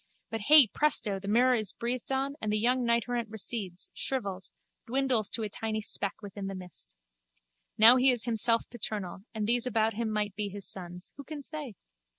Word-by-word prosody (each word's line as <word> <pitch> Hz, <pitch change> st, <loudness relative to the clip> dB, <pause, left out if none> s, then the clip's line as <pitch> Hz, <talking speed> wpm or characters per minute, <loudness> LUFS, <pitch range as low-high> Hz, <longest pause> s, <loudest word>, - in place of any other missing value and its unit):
But 225 Hz, -1 st, -3 dB
hey, 295 Hz, +5 st, +8 dB
presto, 220 Hz, -5 st, +1 dB
the 200 Hz, -, -9 dB
mirror 245 Hz, +5 st, +4 dB
is 215 Hz, -5 st, 0 dB
breathed 240 Hz, +1 st, -4 dB
on 270 Hz, +1 st, 0 dB
and 215 Hz, -, -1 dB
the 210 Hz, -, +2 dB
young 250 Hz, +3 st, +2 dB
knighterrant 235 Hz, 0 st, 0 dB
recedes, 205 Hz, -4 st, -5 dB
shrivels, 200 Hz, -8 st, -3 dB, 0.4 s
dwindles 255 Hz, -4 st, +1 dB
to 225 Hz, -, -1 dB
a -, -, -1 dB
tiny 220 Hz, +1 st, -3 dB
speck 200 Hz, 0 st, -1 dB
within 200 Hz, -1 st, -6 dB
the 195 Hz, -, -5 dB
mist. 180 Hz, -3 st, -10 dB, 0.8 s
Now 230 Hz, +4 st, +8 dB
he 260 Hz, +1 st, +5 dB
is 245 Hz, -2 st, +2 dB
himself 230 Hz, 0 st, +2 dB
paternal 205 Hz, -4 st, -5 dB
and 215 Hz, -1 st, -1 dB
these 240 Hz, +2 st, +2 dB
about 225 Hz, -2 st, +1 dB
him 230 Hz, +1 st, -2 dB
might 210 Hz, -2 st, -1 dB
be 205 Hz, 0 st, -3 dB
his 200 Hz, 0 st, -6 dB
sons. 180 Hz, -1 st, -5 dB
Who 280 Hz, -, -8 dB
can 295 Hz, -1 st, -8 dB
say? 295 Hz, -7 st, -4 dB
225 Hz, 185 wpm, -29 LUFS, 205-245 Hz, 0.8 s, hey